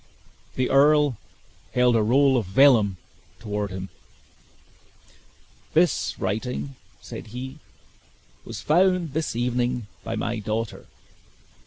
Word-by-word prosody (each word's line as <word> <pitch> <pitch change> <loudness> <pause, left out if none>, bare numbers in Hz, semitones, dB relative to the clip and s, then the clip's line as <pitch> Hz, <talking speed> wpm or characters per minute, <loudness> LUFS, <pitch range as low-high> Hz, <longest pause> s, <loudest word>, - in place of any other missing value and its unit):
The 130 -1 0
earl 145 -3 +4 0.6
held 125 -1 +4
a 115 - +3
roll 135 +5 +4
of 115 -7 0
vellum 105 -3 +4 0.4
toward 105 -2 -3
him. 95 0 -6 1.9
"This 170 +2 +2
writing," 125 +7 -3 0.3
said - - -9
he, 130 +6 -7 0.8
"was 110 -2 -7
found 175 - +2
this 155 -5 -2
evening 120 0 -1 0.2
by 115 - -4
my 115 +1 -2
daughter. 110 +1 -4
125 Hz, 105 wpm, -24 LUFS, 110-140 Hz, 1.9 s, earl